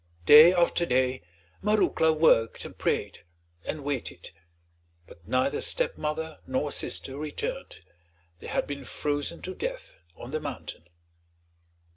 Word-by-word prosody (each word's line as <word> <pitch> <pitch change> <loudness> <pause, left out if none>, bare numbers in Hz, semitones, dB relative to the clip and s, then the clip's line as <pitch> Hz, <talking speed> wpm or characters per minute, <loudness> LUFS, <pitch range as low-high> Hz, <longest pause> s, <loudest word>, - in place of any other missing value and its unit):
Day 155 - +10
after 175 -1 +2
day 130 +1 +1 0.4
Marouckla 210 -6 +3
worked 155 -8 +3
and - - -9
prayed, - - -2 0.4
and 155 -2 -5
waited; 140 -3 -4 0.7
but 85 0 -17
neither 130 +3 +1
stepmother 160 - -2
nor 130 +3 -1
sister 135 -1 -3
returned, 465 - -5 0.6
they - - -10
had - - -1
been 140 -1 -6
frozen 145 +4 -3
to 185 - -5
death - - -5 0.2
on 120 - -10
the 155 - -1
mountain. 145 - -7
150 Hz, 120 wpm, -27 LUFS, 135-170 Hz, 0.7 s, Day